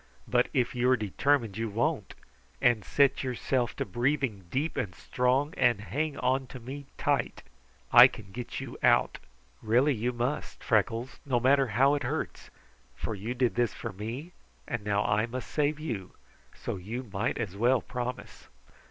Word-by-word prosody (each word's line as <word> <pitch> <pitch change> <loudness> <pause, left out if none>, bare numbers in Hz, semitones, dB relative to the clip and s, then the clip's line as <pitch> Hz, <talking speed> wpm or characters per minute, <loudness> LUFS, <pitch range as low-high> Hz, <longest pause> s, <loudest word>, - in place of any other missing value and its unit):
"But - - +3
if 125 -2 +1
you 125 +1 +2
are 130 - +5
determined 115 +1 +1
you 115 0 -1
won't, 110 +4 -1 0.4
and 120 -4 +3
set 140 +6 +2
yourself 125 -1 -1
to - - -2
breathing 120 -2 -1
deep 145 - -1
and 90 -4 -3
strong, 130 - 0
and 120 -4 +3
hang 140 +7 -2
on 130 +1 0
to 130 - -9
me 135 +4 -8
tight, - - 0 0.5
I 120 +1 +11
can 110 -6 -11
get 120 +3 -5
you - - -7
out. - - +3 0.4
Really 125 +7 +3
you 120 +1 -1
must, 125 +4 -3
Freckles, 115 +3 0
no 130 -4 +1
matter 135 +2 +4
how 135 +3 +5
it 145 - 0
hurts, - - -4 0.5
for 110 - -4
you 110 +5 -4
did 125 -2 +1
this 120 -2 0
for - - -6
me, 115 - -6 0.4
and 120 -4 -3
now 105 0 +1
I 105 +1 +2
must 125 +2 -6
save 150 0 +1
you, 115 - -5 0.4
so - - -4
you 110 +8 -5
might 105 0 -2
as 100 -5 -3
well 120 +5 +3
promise." 125 +1 -6
120 Hz, 170 wpm, -29 LUFS, 110-135 Hz, 0.5 s, I